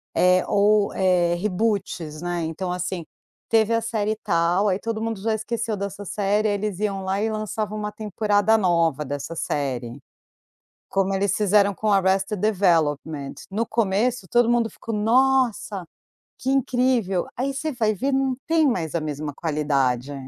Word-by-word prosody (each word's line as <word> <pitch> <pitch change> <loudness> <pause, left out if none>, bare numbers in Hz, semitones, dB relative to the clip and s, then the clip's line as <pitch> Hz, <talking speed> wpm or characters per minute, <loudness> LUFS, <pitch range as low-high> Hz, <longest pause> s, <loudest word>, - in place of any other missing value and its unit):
eh, 180 0 +4
ou 205 0 +3
eh, 180 -2 +2
reboots, 180 -5 -2
né. 175 -1 -2
Então, 165 +3 -3
assim, 180 -1 -3 0.4
teve 225 0 +3
a 230 - +2
série 220 -2 -1
e 220 - -2
tal, 170 +4 +2
aí 190 -1 +1
todo 225 -1 -3
mundo 225 -3 -3
já 225 +2 0
esqueceu 220 0 -3
dessa 200 +1 -5
série, 205 +3 0
aí 205 - +1
eles 205 -2 -3
iam 200 -2 -1
lá 190 +1 -1
e 220 - +1
lançavam 215 0 -3
uma 210 0 -3
temporada 210 0 +1
nova 170 -6 +1
dessa 145 +4 -5
série. 130 -6 -3 0.9
Como 195 0 +1
eles 195 0 +1
fizeram 205 -1 +3
com 215 - -2
o - - +4
Arrested 195 +1 +2
Development, 160 -8 +1 0.2
no 215 +4 0
começo 225 +1 0
todo 240 +3 +3
mundo 240 -1 +2
ficou: 225 - -6
"Nossa, 230 -3 +2 0.6
que 260 - -2
incrível", 250 -8 +1
aí 270 +3 -1
você 305 +4 -3
vai 220 -3 +1
ver 265 +7 -1
não 265 -1 +1
tem 325 0 +3
mais 175 - -1
a 170 - 0
mesma 150 -1 -4
qualidade. 145 -4 0
200 Hz, 165 wpm, -23 LUFS, 175-220 Hz, 0.9 s, eh